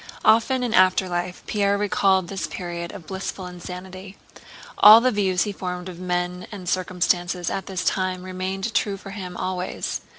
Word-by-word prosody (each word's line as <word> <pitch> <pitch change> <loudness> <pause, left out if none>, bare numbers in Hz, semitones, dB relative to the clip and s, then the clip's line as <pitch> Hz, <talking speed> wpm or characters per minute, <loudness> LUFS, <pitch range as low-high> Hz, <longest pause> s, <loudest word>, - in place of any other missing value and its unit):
Often 230 +4 +4
in 240 -3 -1
afterlife 180 -2 +2
Pierre 200 -1 +1
recalled 195 -3 +2
this 195 +1 -4
period 170 -1 -5
of 165 - -10
blissful 190 +1 -5
insanity. 185 +2 -9 0.6
All 215 +2 +11
the 255 +2 +2
views 190 -4 +1
he 210 - -3
formed 180 -2 -5
of 180 -2 -8
men 180 0 -2
and 190 -4 -8
circumstances 180 -1 0
at 195 - -4
this 185 -2 -3
time 185 -1 0
remained 190 +3 -4
true 200 -2 0
for 195 0 -10
him 185 -3 -7
always. 185 0 -3
185 Hz, 160 wpm, -23 LUFS, 180-195 Hz, 0.6 s, All